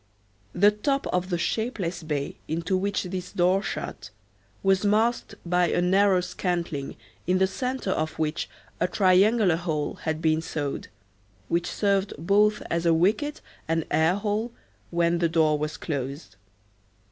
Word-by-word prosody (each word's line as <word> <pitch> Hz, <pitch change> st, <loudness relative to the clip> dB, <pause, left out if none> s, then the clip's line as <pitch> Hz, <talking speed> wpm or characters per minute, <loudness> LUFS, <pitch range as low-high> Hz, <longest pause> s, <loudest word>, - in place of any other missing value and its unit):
The 205 Hz, +3 st, +6 dB
top 275 Hz, +7 st, -1 dB
of 180 Hz, +1 st, 0 dB
the 175 Hz, -, 0 dB
shapeless 185 Hz, -2 st, -2 dB
bay 150 Hz, -3 st, -3 dB
into 165 Hz, +4 st, -1 dB
which 200 Hz, +2 st, 0 dB
this 180 Hz, -1 st, -5 dB
door 185 Hz, +2 st, +2 dB
shut -, -, -5 dB, 0.5 s
was 195 Hz, 0 st, +3 dB
masked 220 Hz, +4 st, +1 dB
by 180 Hz, 0 st, +2 dB
a -, -, +1 dB
narrow 190 Hz, +1 st, +4 dB
scantling 175 Hz, -5 st, -3 dB, 0.3 s
in 185 Hz, +1 st, +3 dB
the 190 Hz, -, +4 dB
centre 250 Hz, +1 st, -2 dB
of 155 Hz, -3 st, -2 dB
which 155 Hz, +1 st, -2 dB, 0.3 s
a -, -, +2 dB
triangular 190 Hz, 0 st, +4 dB
hole 155 Hz, -4 st, -3 dB
had 160 Hz, -1 st, -2 dB
been 160 Hz, 0 st, +2 dB
sawed, 145 Hz, -3 st, -4 dB, 0.6 s
which 175 Hz, +1 st, 0 dB
served 200 Hz, -1 st, 0 dB
both 205 Hz, +6 st, +2 dB
as 170 Hz, 0 st, 0 dB
wicket 200 Hz, -, +2 dB, 0.3 s
and 165 Hz, 0 st, 0 dB
air 160 Hz, +4 st, +3 dB
hole 210 Hz, +3 st, -1 dB, 0.4 s
when 170 Hz, 0 st, +1 dB
the 170 Hz, -1 st, +2 dB
door 155 Hz, -2 st, +3 dB
was 150 Hz, +1 st, -3 dB
closed. 140 Hz, -, -5 dB
180 Hz, 145 wpm, -26 LUFS, 160-200 Hz, 0.6 s, The